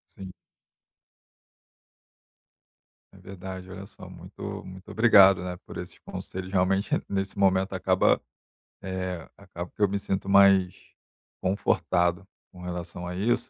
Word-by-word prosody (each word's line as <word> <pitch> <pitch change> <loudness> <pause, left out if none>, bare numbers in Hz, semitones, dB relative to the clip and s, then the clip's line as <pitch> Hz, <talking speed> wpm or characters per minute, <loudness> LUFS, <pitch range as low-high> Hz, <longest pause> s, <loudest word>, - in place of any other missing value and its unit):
Sim. 95 -1 -8 2.8
É - - -17
verdade. 95 -1 -9
Olha 95 +1 -8
só, - - -13
muito - - -8
muito 95 +1 -11
obrigado, 100 -4 +6
né, 90 0 -4
por - - -9
esses - - -8
conselhos, 95 0 -7
realmente, 95 +1 +1 0.2
nesse 95 0 -3
momento, 95 0 +2
acaba, 95 0 +2 0.6
eh, 95 -2 -4
acaba 90 -3 -8
que - - -12
eu 105 - +6
me 100 - -1
sinto 95 0 -3
mais 100 -2 +5 0.7
confortado, 90 -1 +1 0.2
com 90 -1 -13
relação 90 0 -6
a 90 - -5
isso. 115 +6 0
95 Hz, 125 wpm, -27 LUFS, 90-95 Hz, 2.8 s, obrigado